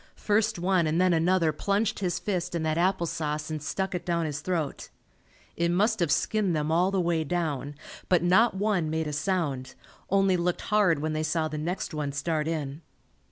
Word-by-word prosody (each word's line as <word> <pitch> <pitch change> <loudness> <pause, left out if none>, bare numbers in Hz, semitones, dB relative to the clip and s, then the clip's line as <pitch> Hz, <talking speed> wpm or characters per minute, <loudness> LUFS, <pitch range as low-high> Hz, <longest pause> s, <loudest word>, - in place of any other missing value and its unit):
First 210 -1 +1
one 175 -1 +2
and 155 +2 +1
then 185 -1 +4
another 165 0 +3
plunged 200 +7 0
his 180 -4 -1
fist 180 -4 -2
in 165 - -1
that 160 +1 0
apple 185 0 +2
sauce 150 -1 -3
and 155 -1 -3
stuck 190 +7 -2
it 180 - -3
down 170 -2 0
his 150 -1 -4
throat. 165 -4 -3 0.7
It 170 0 +1
must 210 +5 +2
have 170 -5 +1
skinned 205 -6 +1
them 150 0 -1
all 175 +3 +3
the 195 -1 0
way 170 -2 +1
down, 150 -4 -2 0.3
but 180 -2 +3
not 190 +6 +4
one 195 -5 0
made 160 0 -1
a 150 - -4
sound, 145 -6 -2 0.3
only 195 -1 +3
looked 175 0 -1
hard 205 -7 +3
when 155 0 -1
they 155 - -1
saw 155 +1 0
the 155 -1 -5
next 175 +3 -3
one 150 -2 -3
start 155 +1 -1
in. 150 -2 -3
170 Hz, 200 wpm, -27 LUFS, 155-185 Hz, 0.7 s, then